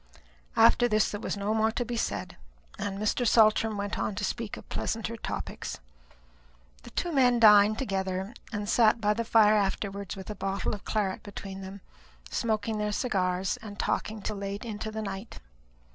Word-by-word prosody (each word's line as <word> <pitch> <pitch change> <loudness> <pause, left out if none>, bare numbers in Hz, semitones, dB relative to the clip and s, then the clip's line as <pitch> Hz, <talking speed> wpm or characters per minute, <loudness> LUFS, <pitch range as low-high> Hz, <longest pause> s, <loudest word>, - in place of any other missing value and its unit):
After 240 - +6
this 215 -2 +2
there 205 - -5
was - - -3
no 200 +2 -1
more 220 0 +3
to 245 - -1
be 240 - -4
said, 230 - -3 0.4
and 195 -1 -3
Mr. 215 +4 0
Saltram 220 -1 +4
went 200 0 -3
on 205 - -1
to 205 - -4
speak 225 +1 -4
of - - -12
pleasanter 225 +1 -3
topics. 225 - -5 1.0
The - - -12
two 350 - -2
men 250 -5 +4
dined 210 -1 +7
together, 190 -3 -2 0.2
and 205 -2 -3
sat 225 +1 +4
by 210 -1 +2
the 230 +2 -2
fire 220 -2 +5
afterwards 200 -1 -1
with 190 +1 -7
a - - -6
bottle 195 0 -2
of 205 - -7
claret 205 -3 -1
between 195 -2 -8
them, 190 +1 -8 0.5
smoking 220 -2 -1
their 210 0 0
cigars, 190 -5 0
and 205 -2 -10
talking 215 +1 -2
till 215 - -3
late 200 +2 -5
into 220 -1 -4
the 220 0 -4
night. 195 +2 -6
210 Hz, 175 wpm, -28 LUFS, 200-220 Hz, 1.0 s, dined